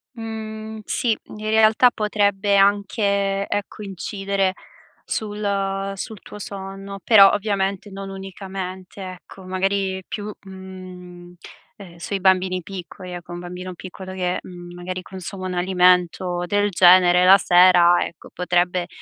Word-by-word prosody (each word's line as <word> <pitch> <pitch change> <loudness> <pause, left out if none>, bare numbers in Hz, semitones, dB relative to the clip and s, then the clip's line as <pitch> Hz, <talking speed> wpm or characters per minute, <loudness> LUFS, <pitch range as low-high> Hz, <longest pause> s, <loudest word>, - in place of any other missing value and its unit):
Mhmm, 220 -1 -7
sì, 230 -3 0
in - - -11
realtà 220 +3 +5
potrebbe 205 -2 +1
anche 200 0 +2
ecco 205 +1 -4
incidere 195 0 -2 0.5
sul 200 -2 -2
sul 210 +1 -7
tuo 210 - -11
sonno. 195 0 -7
Però 200 -4 +8
ovviamente 200 -1 -1
non 195 0 -7
unicamente 190 0 -7
ecco, 185 +1 -10
magari 190 0 -1
più, 210 0 -5
mhmm, 185 -2 -11 0.4
ehm, 185 -4 -12
sui 195 +3 -4
bambini 185 -1 +2
piccoli. 185 0 -9
Ecco 175 0 -8
un 175 - -6
bambino 180 +1 -7
piccolo 185 +1 -9
che, 180 -1 -1
mhmm, 175 -1 -11
magari 180 +1 -6
consuma 185 0 -7
un 185 - -4
alimento 180 -1 +2
del 205 +2 +1
genere 180 -1 +6
la 190 +2 +8
sera, 175 -1 +5
ecco 165 - -9
potrebbe, 175 0 0
190 Hz, 125 wpm, -22 LUFS, 180-200 Hz, 0.5 s, Però